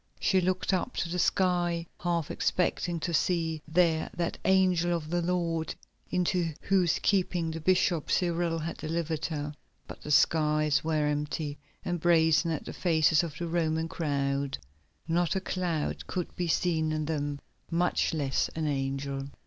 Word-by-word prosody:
She 190 -1 +3
looked 185 +2 0
up 185 +7 -1
to 170 - -1
the 180 +1 -2
sky, 175 -2 +1
half 170 -3 -1
expecting 175 -1 0
to 170 - -2
see 165 -1 +1
there 165 -1 +2
that 170 -1 -2
angel 180 -2 +3
of 155 -1 -8
the 175 0 +1
Lord 170 -2 -1 0.3
into 175 -3 0
whose 185 -4 +2
keeping 180 -4 +1
the 165 0 -5
bishop, 175 -2 +2
Cyril, 170 -1 +1
had 165 +1 -4
delivered 160 -1 -2
her. 150 -2 -4 0.3
But - - -10
the - - -8
skies 150 0 +3
were 155 -2 +1
empty 150 0 -2 0.3
and 175 -1 -1
brazen 160 0 +4
as 160 -3 -2
the - - -7
faces 160 -3 +3
of 165 -4 -5
the 175 - -3
Roman 160 -1 0
crowd; 140 -3 -1 0.5
not 175 +2 +1
a - - +2
cloud 180 -5 -2
could 180 -2 -4
be 175 - -2
seen 160 -2 +1
in 155 -1 -1
them, 145 -2 -2 0.3
much 175 +1 +1
less 140 -4 0
an 160 -1 -1
angel. 135 -1 -2
165 Hz, 155 wpm, -29 LUFS, 155-175 Hz, 0.5 s, brazen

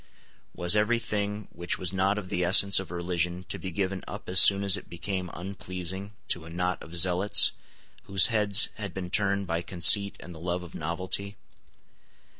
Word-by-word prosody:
Was 90 +3 +2
every 105 +3 +1
thing 105 -2 -4
which 85 0 -4
was 90 0 -4
not 95 +2 0
of 95 -3 -7
the 90 - -2
essence 95 +2 +6
of 95 - -8
religion 90 +1 -3
to - - -4
be 95 - -6
given 95 +1 -4
up - - -9
as 95 +1 +5
soon 100 +1 +7
as 100 -1 +4
it 100 - -9
became 90 +1 -5
unpleasing 95 +1 -7 0.2
to 85 -2 -3
a - - -11
knot 90 +2 -3
of 85 +2 -9
zealots 90 +3 +4 0.5
whose 95 -1 +6
heads 105 -2 +3
had 100 -4 -7
been 90 -2 -6
turned 100 -1 0
by 85 -1 -3
conceit 95 +3 +4
and 90 - -11
the 80 - -12
love 90 +1 -4
of 85 - -13
novelty? 95 +5 -3
95 Hz, 185 wpm, -26 LUFS, 90-100 Hz, 0.5 s, soon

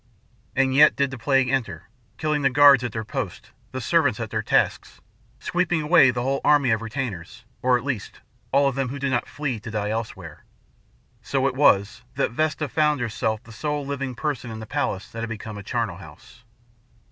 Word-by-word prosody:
And 135 0 +2
yet 150 +3 +6
did 140 -1 0
the 135 - -6
plague 135 +2 +2
enter, 110 -11 -2 0.3
killing 150 -1 0
the 135 - +3
guards 140 -1 +6
at 120 - -3
their 110 +1 -4
posts, 105 - -5 0.2
the - - -4
servants - - +2
at - - -5
their - - -1
tasks, - - 0 0.4
sweeping 175 -3 0
away 150 -3 +6
the 120 -1 -1
whole 135 +2 -1
army 145 -4 +4
of 110 0 +1
retainers 115 -7 -6 0.2
or, 125 0 +3
at 120 - -7
least, 130 -7 -4 0.3
all 140 +1 +4
of 135 - 0
them 135 -1 -2
who 140 - -5
did 140 -1 -2
not 120 -2 0
flee 135 -6 -3
to 110 - -8
die 105 -1 -2
elsewhere. 100 -8 -6 0.8
So - - -1
it - - +1
was 100 +4 +3
that - - 0
Vesta 155 +3 -1
found 150 +1 +1
herself 110 -1 -2
the 115 - -14
sole 150 +4 -3
living 135 -2 -4
person 145 -4 -3
in 110 -1 -7
the 110 - -7
palace 95 -2 -2
that 115 - -7
had 115 0 -4
become 110 -1 -7
a - - -7
charnel 110 -3 -2
house. 90 +6 -15
125 Hz, 200 wpm, -24 LUFS, 110-140 Hz, 0.8 s, yet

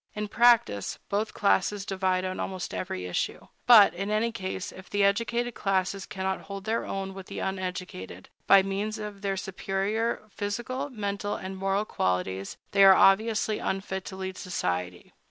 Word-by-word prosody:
In 210 0 -3
practice, 230 - +3
both 210 +2 -1
classes 200 0 +1
divide 185 -1 0
on 185 0 -3
almost 185 -2 -4
every 95 - -4
issue. 90 - -3 0.2
But, 220 -5 +9
in 195 +4 -4
any 215 +2 +1
case, 190 -3 -5
if 190 0 -12
the 205 0 +1
educated 230 +4 +1
classes 195 -1 -1
cannot 190 0 -3
hold 195 0 -7
their 225 +2 -1
own 195 0 -4
with 190 -1 -9
the - - -8
uneducated, 180 - -5 0.2
by 195 -1 +7
means 200 +3 -2
of 210 -2 -7
their 195 -1 -1
superior 195 +5 -2
physical, 240 +8 -3
mental, 205 -4 -3
and 190 0 -6
moral 195 +2 0
qualities, 95 - -2
they 200 0 +5
are 195 -1 +9
obviously 215 +2 +3
unfit 190 0 -3
to 190 - -7
lead 190 -1 -5
society. 90 - -3
195 Hz, 160 wpm, -27 LUFS, 185-210 Hz, 0.2 s, But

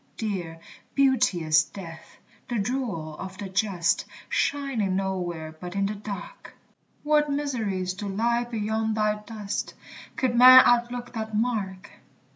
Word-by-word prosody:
Dear, 180 -7 -4 0.4
beauteous 175 - +3
death, 165 -3 -11 0.3
the 240 - -1
jewel 200 - -3
of 190 0 -7
the 200 0 -5
just, 190 -4 +1 0.2
Shining 265 -9 0
nowhere 175 -5 -3
but 180 +1 -7
in 195 0 +1
the 205 - -1
dark! 210 - -8 0.5
What 300 0 +3
mysteries 220 -11 -2
do 205 +2 -6
lie 235 +4 0
beyond 220 -1 -1
thy 215 -1 +1
dust, 210 -2 -5 0.4
Could 255 -2 0
man 255 +1 +10
outlook 245 0 +1
that 220 -2 -4
mark! 205 -5 -2
210 Hz, 125 wpm, -26 LUFS, 190-240 Hz, 0.5 s, man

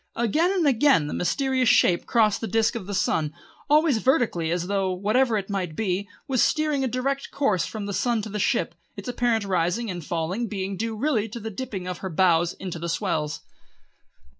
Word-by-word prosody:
Again 300 - +2
and 370 -4 +1
again 270 - +4
the 145 - -4
mysterious 260 - +1
shape 175 -1 +3
crossed 215 -4 +2
the 225 - -2
disc 225 0 +2
of 215 -5 -6
the 200 - -3
sun, 155 -5 0 0.3
always 300 -5 +4
vertically 220 -10 +1
as 175 +1 -1
though, 195 0 0
whatever 215 +6 +2
it 195 -2 -3
might 185 -6 -3
be, 185 -3 0
it 200 - -8 0.2
was 260 -4 +1
steering 305 -3 +1
a - - +1
direct 270 +3 -2
course 215 -11 0
from 215 -2 -5
the 200 - -4
sun 235 +1 0
to 215 - -5
the 210 +1 -4
ship, - - +1 0.2
its - - -7
apparent 240 -3 0
rising 185 +4 0
and 175 -2 -6
falling 175 +9 -2
being 195 -2 -3
due 225 +3 -3
really 225 -4 0
to 235 - -7
the 220 0 -6
dipping 200 -4 -5
of 180 -1 -4
her 190 - -4
bows 175 -1 +3
into 180 -3 -6
the 170 +1 -4
swells. 160 -4 -2
210 Hz, 205 wpm, -25 LUFS, 180-245 Hz, 0.3 s, again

